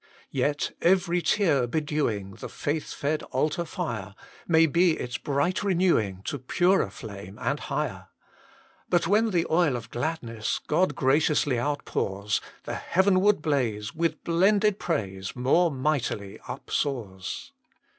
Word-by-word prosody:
Yet 145 Hz, +2 st, 0 dB
every 175 Hz, -1 st, +3 dB
tear 160 Hz, -, +2 dB
bedewing 120 Hz, -, -1 dB
The -, -, -6 dB
faith 150 Hz, +1 st, -3 dB
fed 150 Hz, +2 st, -1 dB
altar 155 Hz, +6 st, 0 dB
fire 105 Hz, -, -4 dB, 0.3 s
May 165 Hz, -1 st, +5 dB
be 170 Hz, +2 st, +3 dB
its 125 Hz, +1 st, -4 dB
bright 145 Hz, +6 st, 0 dB
renewing 170 Hz, -, +1 dB
To 145 Hz, +4 st, -3 dB
purer 175 Hz, -, +2 dB
flame, 100 Hz, -1 st, -9 dB
and -, -, -1 dB
higher. -, -, -3 dB, 0.8 s
But 175 Hz, -1 st, +3 dB
when 215 Hz, +5 st, +3 dB
the 175 Hz, -4 st, +1 dB
oil 160 Hz, -5 st, +3 dB
of 115 Hz, -1 st, -7 dB
gladness 120 Hz, -5 st, -2 dB
God 155 Hz, -1 st, +2 dB
graciously 145 Hz, -1 st, +2 dB
outpours, 105 Hz, -7 st, -1 dB, 0.2 s
The -, -, -5 dB
heavenward 190 Hz, -1 st, +3 dB
blaze, 120 Hz, -6 st, 0 dB
With 160 Hz, -1 st, -1 dB
blended 200 Hz, +4 st, +3 dB
praise, 95 Hz, -, -3 dB
More 140 Hz, +8 st, +3 dB
mightily 130 Hz, -8 st, -2 dB
upsoars. 100 Hz, -10 st, -3 dB
145 Hz, 125 wpm, -27 LUFS, 115-170 Hz, 0.8 s, May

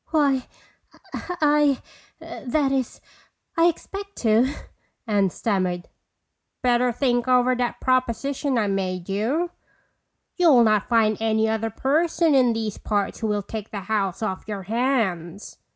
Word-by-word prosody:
"Why,—I—that 290 Hz, -1 st, -2 dB
is, 265 Hz, -3 st, -2 dB, 0.5 s
I 330 Hz, -1 st, +4 dB
expect 395 Hz, +4 st, -4 dB
to," 230 Hz, +4 st, +3 dB, 0.5 s
Anne 205 Hz, -4 st, +2 dB
stammered. 180 Hz, -3 st, -2 dB, 0.7 s
"Better 245 Hz, 0 st, +3 dB
think 245 Hz, 0 st, 0 dB
over 250 Hz, 0 st, +4 dB
that 245 Hz, -1 st, -2 dB
proposition 255 Hz, +2 st, 0 dB
I 220 Hz, -, +2 dB
made 185 Hz, -2 st, -2 dB
you. 260 Hz, -, -1 dB, 0.9 s
You'll 310 Hz, -10 st, +6 dB
not 215 Hz, -2 st, +2 dB
find 220 Hz, -3 st, +3 dB
any 220 Hz, 0 st, +2 dB
other 220 Hz, 0 st, -1 dB
person 315 Hz, -, +1 dB
in 255 Hz, -3 st, +4 dB
these 220 Hz, -2 st, -3 dB
parts 205 Hz, -2 st, -2 dB
who 225 Hz, -, -2 dB
will 205 Hz, -1 st, -1 dB
take 215 Hz, +1 st, -7 dB
the 200 Hz, -, -5 dB
house 200 Hz, -1 st, -2 dB
off 190 Hz, -3 st, -4 dB
your 205 Hz, -3 st, -5 dB
hands. 210 Hz, -6 st, -2 dB
235 Hz, 120 wpm, -23 LUFS, 210-270 Hz, 0.9 s, You'll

